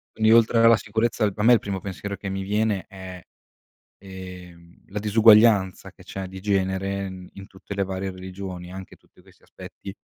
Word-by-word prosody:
Quindi 110 Hz, 0 st, +4 dB
oltre 115 Hz, 0 st, +4 dB
alla 115 Hz, 0 st, +7 dB
sicurezza 110 Hz, +1 st, 0 dB
per 105 Hz, +2 st, -3 dB
me 120 Hz, -, +7 dB
il 115 Hz, -, +5 dB
primo 100 Hz, -2 st, -4 dB
pensiero 100 Hz, +1 st, -6 dB
che 100 Hz, -, -7 dB
mi 95 Hz, 0 st, -3 dB
viene 105 Hz, -1 st, 0 dB
è, 95 Hz, -2 st, -10 dB, 0.8 s
ehm, 90 Hz, -3 st, -12 dB
la 105 Hz, -, -8 dB
disuguaglianza 105 Hz, -2 st, +4 dB
che -, -, -18 dB
c'è 95 Hz, -1 st, -6 dB
di 95 Hz, +1 st, -10 dB
genere 95 Hz, 0 st, -1 dB
in 95 Hz, -1 st, -9 dB
in 100 Hz, -, -10 dB
tutte 95 Hz, +1 st, -10 dB
le 100 Hz, -, 0 dB
varie 95 Hz, 0 st, -4 dB
religioni, 95 Hz, -1 st, -8 dB
anche 95 Hz, 0 st, -10 dB
tutti -, -, -25 dB
questi -, -, -23 dB
aspetti 100 Hz, -, -11 dB
95 Hz, 180 wpm, -24 LUFS, 95-105 Hz, 0.8 s, alla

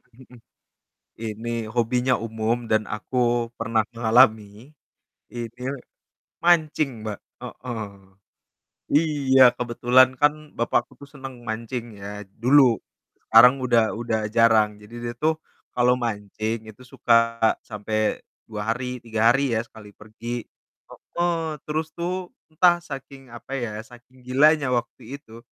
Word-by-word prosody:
Mhm 130 Hz, -, -15 dB
mhm. 120 Hz, -, -15 dB, 0.8 s
Ini 115 Hz, 0 st, -5 dB
hobinya 125 Hz, +2 st, +1 dB
umum 115 Hz, +1 st, -2 dB
dan 110 Hz, -1 st, +2 dB
aku 120 Hz, +2 st, 0 dB
pernah 115 Hz, -1 st, 0 dB
ngalami, 110 Hz, -1 st, +3 dB, 0.6 s
ini 120 Hz, -2 st, -6 dB
l 130 Hz, +2 st, -3 dB, 0.7 s
mancing 155 Hz, -8 st, +2 dB
Mbak, 105 Hz, -2 st, -4 dB, 0.3 s
heeh. 115 Hz, -4 st, -6 dB, 1.0 s
Iya, 145 Hz, -4 st, +3 dB
kebetulan 125 Hz, +1 st, +4 dB
kan 150 Hz, +1 st, +4 dB, 0.2 s
bapakku 120 Hz, +1 st, -1 dB
tuh 140 Hz, -, -12 dB
senang 135 Hz, -2 st, -8 dB
mancing 115 Hz, +1 st, -5 dB
ya 100 Hz, 0 st, -8 dB, 0.2 s
dulu, 140 Hz, +3 st, +6 dB, 0.7 s
sekarang 125 Hz, +2 st, +8 dB
udah 120 Hz, -3 st, +2 dB
udah 110 Hz, -2 st, -2 dB
jarang, 115 Hz, -2 st, +5 dB
jadi 110 Hz, +3 st, -14 dB
dia 120 Hz, 0 st, -4 dB
tuh 160 Hz, 0 st, +2 dB, 0.4 s
kalau 125 Hz, 0 st, +3 dB
mancing 110 Hz, -1 st, -3 dB
itu 120 Hz, +4 st, -16 dB
suka 125 Hz, -2 st, 0 dB, 0.6 s
sampai 110 Hz, +1 st, -1 dB, 0.3 s
2 105 Hz, -1 st, -4 dB
hari, 125 Hz, 0 st, -5 dB
3 115 Hz, 0 st, +2 dB
hari 135 Hz, -2 st, +1 dB
ya, 110 Hz, -, 0 dB
sekali 105 Hz, -2 st, -15 dB
pergi. 115 Hz, +3 st, -7 dB, 0.5 s
Heeh, 165 Hz, -3 st, -3 dB
terus 155 Hz, +1 st, -2 dB
tuh 180 Hz, +1 st, -4 dB, 0.2 s
entah 175 Hz, +2 st, +3 dB
saking, 135 Hz, -4 st, -10 dB
apa 120 Hz, +3 st, -8 dB
ya, 115 Hz, -5 st, -4 dB
saking 125 Hz, +1 st, -18 dB
gilanya 140 Hz, 0 st, +3 dB
waktu 120 Hz, 0 st, -3 dB, 0.2 s
itu, 115 Hz, -2 st, -14 dB
120 Hz, 125 wpm, -24 LUFS, 110-135 Hz, 1.0 s, sekarang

